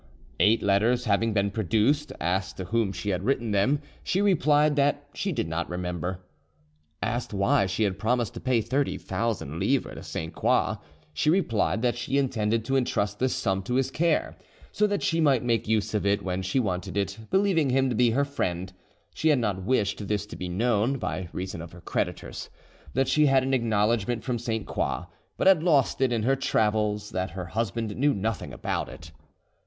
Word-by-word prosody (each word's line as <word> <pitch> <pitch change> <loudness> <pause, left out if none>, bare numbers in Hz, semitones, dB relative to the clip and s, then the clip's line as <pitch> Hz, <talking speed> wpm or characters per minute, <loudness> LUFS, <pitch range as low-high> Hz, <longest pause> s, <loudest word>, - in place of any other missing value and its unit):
Eight 110 +2 +4
letters 110 +5 +2
having 110 +1 +2
been 100 -1 +1
produced, 115 - +1
asked 95 +3 -1
to 95 - -4
whom 110 +1 0
she 100 +2 -3
had 90 -1 -1
written 120 -2 0
them, 130 +9 +2 0.2
she 185 - 0
replied 150 -6 +3
that 145 0 +1
she 195 - -2
did 145 - -2
not 80 +1 -3
remember. 90 +1 -4 0.8
Asked 115 0 -2
why 100 0 +3
she 95 +4 0
had 100 -2 -1
promised 120 0 0
to - - -7
pay 125 -3 +1
30,000 115 - -2
livres - - 0
to - - -7
Sainte 80 0 -5
Croix, - - +1 0.4
she 115 - +1
replied 125 - +1
that 120 -1 +2
she 135 +3 -1
intended 115 -5 0
to 135 - 0
entrust 105 -5 -1
this 130 0 +1
sum 95 -2 0
to 125 +6 -3
his 135 0 +1
care, 165 +1 +1 0.4
so 210 - +2
that 205 -1 -1
she 165 0 +1
might 140 -6 +3
make 115 -3 0
use 110 -1 0
of 105 - 0
it 100 +1 +1
when 95 0 -2
she 95 +8 0
wanted 95 -3 -2
it, 100 +1 -1
believing 190 -7 +2
him 135 +1 +3
to 125 - -1
be 120 +1 +4
her 140 +5 +2
friend; 90 -9 -3 0.4
she 160 - +1
had 150 - +5
not 105 -6 -1
wished 105 -2 0
this 105 -1 -1
to - - -10
be 90 - -5
known, 115 +6 +1
by 90 -7 -4
reason 90 -2 -5
of 85 0 -10
her 90 - -12
creditors; - - -3 0.5
that 135 0 +2
she 150 -1 +4
had 135 -1 +4
an 135 +1 -1
acknowledgment 115 -1 +1
from 125 -3 -2
Sainte 110 -2 -3
Croix, - - -2 0.3
but - - -1
had 190 -4 +6
lost 150 -6 +2
it 130 -2 +3
in 115 -2 0
her 135 +4 +3
travels; 105 -4 0
that 95 0 -2
her 90 +2 -6
husband 110 +3 -2
knew 145 +3 +2
nothing 105 0 -3
about - - -3
it. 80 +1 -11
110 Hz, 195 wpm, -26 LUFS, 100-135 Hz, 0.8 s, had